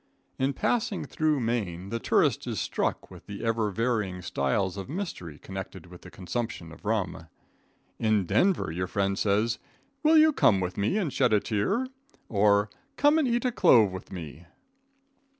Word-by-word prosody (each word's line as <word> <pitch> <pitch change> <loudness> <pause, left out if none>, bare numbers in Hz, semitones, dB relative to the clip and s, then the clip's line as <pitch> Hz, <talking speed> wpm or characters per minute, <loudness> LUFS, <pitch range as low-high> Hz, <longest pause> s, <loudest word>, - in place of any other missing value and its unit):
In 135 +1 +1
passing 225 - -1
through 155 -3 0
Maine 100 -6 -2
the 115 +2 -2
tourist - - +1
is - - -2
struck - - -2
with - - -13
the 100 +1 -6
ever 115 -2 +1
varying 105 -4 -1
styles 90 +9 -1
of 100 +2 -7
mystery 145 - -5
connected 95 -1 -8
with 90 0 -13
the 90 - -12
consumption 95 -2 -5
of 80 - -14
rum. 105 -6 -2 0.7
In 110 -3 +2
Denver 185 - +2
your 90 +3 -3
friend 100 +1 0
says: 105 +3 +1 0.4
"Will 315 +1 +5
you 310 0 +6
come 100 - +4
with 90 -1 -3
me 105 - 0
and 175 -10 -1
shed 120 - +2
a 105 - +5
tear?" 105 - 0 0.4
or 100 0 +3 0.3
"Come 295 +2 +4
and 295 - +2
eat 240 +1 0
a 250 - +2
clove 110 - +5
with 95 - -9
me." 85 -2 -8
105 Hz, 170 wpm, -27 LUFS, 95-130 Hz, 0.7 s, you